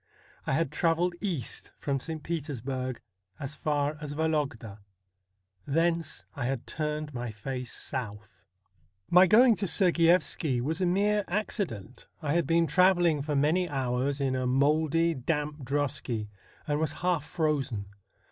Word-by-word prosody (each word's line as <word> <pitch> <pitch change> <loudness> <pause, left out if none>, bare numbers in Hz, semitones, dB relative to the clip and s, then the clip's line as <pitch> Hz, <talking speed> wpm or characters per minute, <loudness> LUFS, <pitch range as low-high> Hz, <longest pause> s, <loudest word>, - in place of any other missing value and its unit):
I - - +1
had 150 0 +1
travelled 170 +3 +1
east 175 - -3
from 140 -1 -1
St. 160 +2 -5
Petersburg 135 -5 -3 0.4
as 135 +1 -4
far 150 -1 -1
as 145 -1 -5
Vologda; 145 -9 -1 0.9
thence 165 +2 0
I 140 -5 -3
had 130 -1 -2
turned 150 -1 -3
my 120 -1 -4
face 125 +4 -5
south. 110 -6 -6 0.7
My 180 +2 +8
going 230 +4 +6
to 195 - -1
Sergiyevski 170 -6 +3
was 155 +8 -2
a 180 - +3
mere 205 +3 +2
accident. 170 - -3
I 150 -3 -1
had 170 0 +1
been 165 0 +3
travelling 175 -1 +4
for 150 +1 -2
many 160 +6 +2
hours 135 0 -1
in 135 -2 0
a 130 -1 -1
mouldy, 155 +5 +2
damp 150 +1 -2
drosky, 130 -5 -2 0.4
and 145 0 0
was 155 -2 0
half 175 -5 +2
frozen. 140 - -1
150 Hz, 140 wpm, -29 LUFS, 130-165 Hz, 0.9 s, My